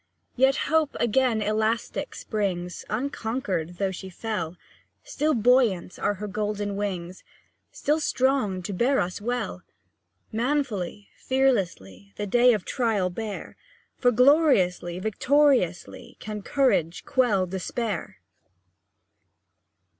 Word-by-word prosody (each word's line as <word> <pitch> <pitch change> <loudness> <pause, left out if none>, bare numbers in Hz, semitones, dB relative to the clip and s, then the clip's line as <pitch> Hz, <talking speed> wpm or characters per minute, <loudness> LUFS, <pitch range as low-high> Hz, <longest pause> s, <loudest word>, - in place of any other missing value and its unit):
Yet 265 +1 +4
Hope 315 -1 +1
again 235 -1 +2
elastic 220 +2 -1
springs, 180 -5 -3
Unconquered, 215 - -2
though 195 0 0
she 190 +1 -7
fell; 180 -4 -4 0.5
Still 310 - 0
buoyant 225 -6 +2
are 205 - 0
her 205 +2 -6
golden 205 0 -2
wings, 185 -3 -4 0.5
Still 300 +2 0
strong 255 - +1
to 200 - -4
bear 255 +8 +2
us 180 +3 -2
well. 230 -5 -3 0.7
Manfully, 225 -6 -2
fearlessly, 175 - -1
The 205 - -3
day 240 +4 +5
of 210 -4 -2
trial 220 -8 0
bear, 215 +1 -6 0.4
For 245 - +4
gloriously, 245 - +3
victoriously, 220 - +1
Can 210 -1 -6
courage 200 - +1
quell 220 -8 +2
despair! 190 - -4
215 Hz, 105 wpm, -26 LUFS, 185-255 Hz, 0.7 s, day